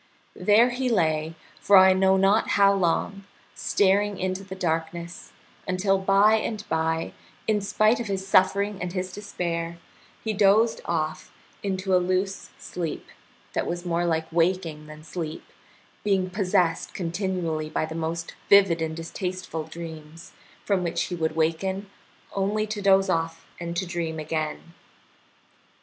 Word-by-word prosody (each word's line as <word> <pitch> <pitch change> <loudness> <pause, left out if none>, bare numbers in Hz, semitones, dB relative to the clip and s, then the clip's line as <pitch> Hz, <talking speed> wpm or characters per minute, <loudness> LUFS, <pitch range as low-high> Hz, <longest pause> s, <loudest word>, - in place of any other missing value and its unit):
There 225 +4 +4
he 255 +1 -1
lay 160 -6 +1 0.2
for 200 - +6
I 190 0 +8
know 190 0 +3
not 195 +3 +3
how 200 0 +6
long, 195 +2 0 0.3
staring 200 +1 +2
into 185 +1 -2
the 190 -1 -8
darkness, 170 0 -3 0.4
until 190 +1 +1
by 195 +3 +4
and 215 -1 -4
by, 160 0 -1 0.3
in 210 -1 +2
spite 215 +3 +2
of 235 - -4
his 195 -1 -3
suffering 195 +1 +3
and 180 -1 -3
his 185 -1 -3
despair, 170 -4 -4 0.5
he 220 - -1
dozed 210 +3 +3
off 155 -2 -2 0.3
into 190 -1 0
a 180 - +4
loose 185 +2 -1
sleep, 170 -4 -5 0.4
that - - -1
was 175 +1 -4
more 170 0 0
like 160 -2 0
waking 165 -2 0
than 155 0 -11
sleep, 160 -1 -5 0.6
being 190 -3 +1
possessed 180 -3 0
continually 170 -3 -2
by 155 - -1
the 160 - -7
most 165 +1 -3 0.2
vivid 195 -5 +6
and 160 0 -2
distasteful 170 -1 -4
dreams, 165 +1 -9 0.3
from 195 -3 +1
which 170 -1 -2
he 180 - -4
would 160 -2 -1
awaken 190 +5 -1 0.4
only 205 +2 0
to 215 -1 -4
doze 195 0 +4
off 165 -2 -1
and 170 0 -4
to 185 - 0
dream 170 -2 -3
again. 155 +1 -4
185 Hz, 145 wpm, -25 LUFS, 165-195 Hz, 0.6 s, I